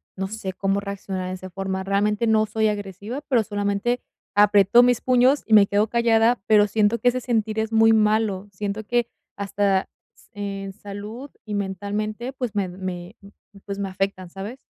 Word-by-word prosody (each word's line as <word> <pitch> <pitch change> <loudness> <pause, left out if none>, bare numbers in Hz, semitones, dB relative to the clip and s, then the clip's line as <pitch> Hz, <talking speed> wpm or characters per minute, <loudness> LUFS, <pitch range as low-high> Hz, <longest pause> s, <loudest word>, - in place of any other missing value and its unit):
no 190 0 -3
sé 195 -2 -5
cómo 195 +1 0
reaccionar 195 -2 -5
de - - -4
esa 185 0 -9
forma. 190 +1 -3
Realmente, 205 +3 +1
no 220 -1 +3
soy 220 +1 0
agresiva, 205 +5 -4
pero 245 -5 +3
solamente 205 +3 -1 0.4
aprieto 205 +2 +6
mis 245 -1 +3
puños 255 +3 +3
y 220 - -1
me 210 -2 +8
quedo 205 +2 +2
callada, 235 0 +3
pero 210 -1 +5
siento 215 +2 +1
que 245 - 0
ese 255 +1 -1
sentir 220 -3 -1
es 220 0 -2
muy 225 0 +6
malo, 215 -2 +2
siento 205 +2 -4
que 240 +1 +1 0.3
hasta 200 -1 0 0.3
s - - -24
en 195 -1 -5
salud 210 +6 -8
y 210 - -6
mentalmente, 205 +4 -3
pues 250 -5 -4
me 195 -3 0
me 180 +1 -6
m 200 0 -15 0.3
pues, 200 0 -5
me 200 -1 -2
afectan, 190 -1 -3
¿sabes? 200 +8 -7
205 Hz, 180 wpm, -23 LUFS, 195-225 Hz, 0.4 s, me